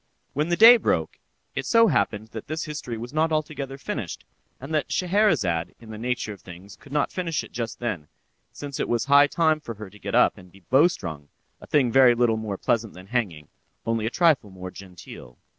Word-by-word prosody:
When 150 +4 -1
the 175 - +2
day 235 +2 +10
broke, - - -1 0.3
it - - -4
so 230 -1 +5
happened 110 - 0
that 110 -1 -8
this 155 +1 -3
history 150 -7 -5
was 120 +4 -8
not 160 +1 +1
altogether 145 -3 -3
finished, 140 - -5 0.3
and 135 +5 -7
that 155 - -1
Scheherazade, 165 - +1
in 115 -1 -12
the 110 - -7
nature 120 -2 -2
of 100 - -15
things 95 +3 -12
could 140 - -18
not 145 0 0
finish 170 -5 -2
it - - -13
just 115 -2 -4
then, 105 -11 -4 0.4
since 140 -1 -7
it - - -2
was 120 0 0
high 140 +1 +6
time 155 0 +2
for 115 -6 -8
her 105 -2 -10
to 105 - -16
get - - -4
up - - +4
and 90 -1 -16
be 100 - -18
bowstrung—a 95 - -1
thing 130 -5 +2
very 125 -1 +6
little 120 -2 +2
more 105 -3 -4
pleasant 115 0 -1
than 90 +1 -11
hanging, 95 - -2 0.4
only 115 -1 0
a - - 0
trifle 155 - +2
more 95 -1 -8
genteel! 90 -10 -12
120 Hz, 205 wpm, -25 LUFS, 105-150 Hz, 0.4 s, day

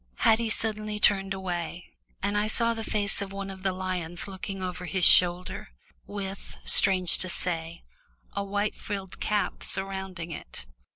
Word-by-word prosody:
Haddie 225 - +3
suddenly 215 -1 -1
turned 195 -2 +3
away, 180 -2 -4 0.3
and 200 +1 0
I 210 +1 +1
saw 230 +1 +4
the 225 -1 -5
face 205 -2 +1
of 195 -1 -5
one 195 0 -5
of 190 -1 -10
the 190 0 +1
lions 185 -2 -4
looking 195 0 -6
over 180 0 -4
his 185 -1 +2
shoulder, 180 - +5 0.4
with, 195 -1 -6
strange 185 -3 +4
to 185 - -3
say, 170 -1 -3 0.5
a 200 - -2
white 205 +1 -1
frilled 195 -3 -6
cap 210 -1 -1
surrounding 190 -3 -2
it. - - -8
195 Hz, 155 wpm, -27 LUFS, 180-205 Hz, 0.5 s, shoulder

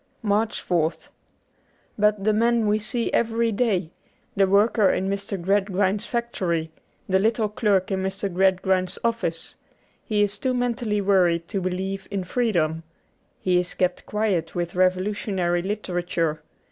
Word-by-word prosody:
'' - - -42
69 - - -1
MARCH 215 +2 0
4th 165 -2 0 0.9
BUT 210 -1 +2
the 215 +1 +3
man 230 +1 +2
we 210 +1 +2
see 235 +2 -2
every 230 0 +1
day 200 -7 0 0.2
— - - -40
the 195 -1 +4
worker 205 +1 +4
in 190 - 0
Mr. 200 0 -3
Gradgrind's 195 +2 +1
factory, 180 -9 -2 0.4
the 190 -1 +3
little 220 +1 +1
clerk 205 -4 +1
in 190 -1 0
Mr. 190 +1 -2
Gradgrind's 185 0 +1
office 230 -8 -2 0.2
— - - -38
he 210 -2 +1
is 205 0 -1
too 255 -1 0
mentally 235 -4 0
worried 175 -4 +2
to 195 -3 -2
believe 190 +1 -3
in 195 -2 -2
freedom. 175 -7 0 0.6
He 180 -1 +3
is 180 0 -3
kept 180 -1 -1
quiet 200 -6 -1
with 175 -1 -2
revolutionary 185 -1 +1
literature. 175 -5 -2
195 Hz, 150 wpm, -24 LUFS, 180-215 Hz, 0.9 s, the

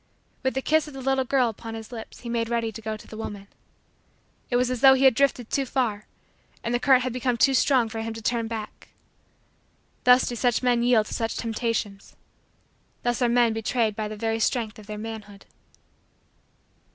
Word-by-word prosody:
With 260 0 -1
the 265 - -1
kiss 315 0 +2
of 295 - -10
the 270 - -7
little 265 0 +1
girl 255 -1 +2
upon 225 0 -6
his 220 0 -9
lips 225 -2 -9
he 240 - -9
made 230 -1 -1
ready 230 -1 -1
to 225 - -9
go 215 0 -4
to - - -15
the - - -11
woman. 205 -2 -7 1.0
It 245 - 0
was 250 +1 +2
as 250 -2 -3
though 265 -1 +8
he 265 - +1
had 265 -2 +7
drifted 250 -2 0
too 275 - +1
far 225 -6 -1 0.6
and 235 - -2
the 245 - +2
current 260 -1 +4
had 255 -2 -2
become 250 -1 -1
too 270 +4 +4
strong 255 -2 +3
for 225 0 -5
him 225 0 -4
to 225 - -7
turn 230 0 0
back. 220 -2 -7 1.2
Thus 250 +1 +6
do 240 - -3
such 245 0 +1
men 245 -1 +3
yield 240 -3 +4
to - - -8
such 225 -1 -2
temptations. 225 -3 -3 0.9
Thus 240 +1 0
are 245 - +3
men 235 -1 +3
betrayed 225 -1 0
by 215 0 -3
the 215 0 -7
very 225 +1 -1
strength 225 -1 -1
of 210 - -14
their 210 -1 -6
manhood. 210 -2 -8
235 Hz, 205 wpm, -25 LUFS, 220-250 Hz, 1.2 s, though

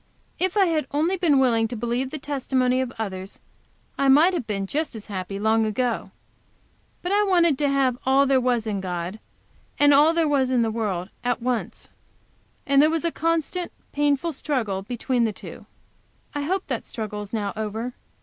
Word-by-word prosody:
If 375 +2 0
I 395 - +6
had 315 -5 0
only 315 +6 +1
been 340 -6 +3
willing 235 -4 +3
to 240 - -6
believe 240 +3 -2
the 310 - -5
testimony 260 -3 0
of 255 -2 -3
others 195 -3 -5 0.6
I 275 - +3
might 305 +7 +6
have 315 -10 -3
been 195 -2 -2
just 295 +5 -2
as 215 - -8
happy 195 -1 -5
long 220 +2 +2
ago. 230 +2 -1 0.9
But 355 - -2
I 410 +1 +4
wanted 345 -6 +3
to 290 -1 +2
have 265 -3 +1
all 270 +1 +4
there 270 -1 +3
was 245 -3 +1
in 205 -3 -2
God 180 +2 -4 0.6
and 290 0 +6
all 295 +3 +6
there 330 -2 +2
was 275 -3 +2
in 250 -2 +2
the 225 - 0
world, 200 -5 -2
at 245 -1 0
once, 245 -1 -3 0.7
and 275 0 +5
there 305 - +5
was 325 +1 -1
a 335 - +1
constant, 330 +2 -1 0.2
painful 290 +3 +1
struggle 235 -10 -2
between 240 +3 -1
the 225 - +1
two. - - -11 0.7
I 290 - -2
hope 375 +4 -1
that - - -3
struggle 210 -3 -5
is 205 - -9
now 205 -3 -2
over. 220 +3 -4
255 Hz, 190 wpm, -24 LUFS, 220-295 Hz, 0.9 s, I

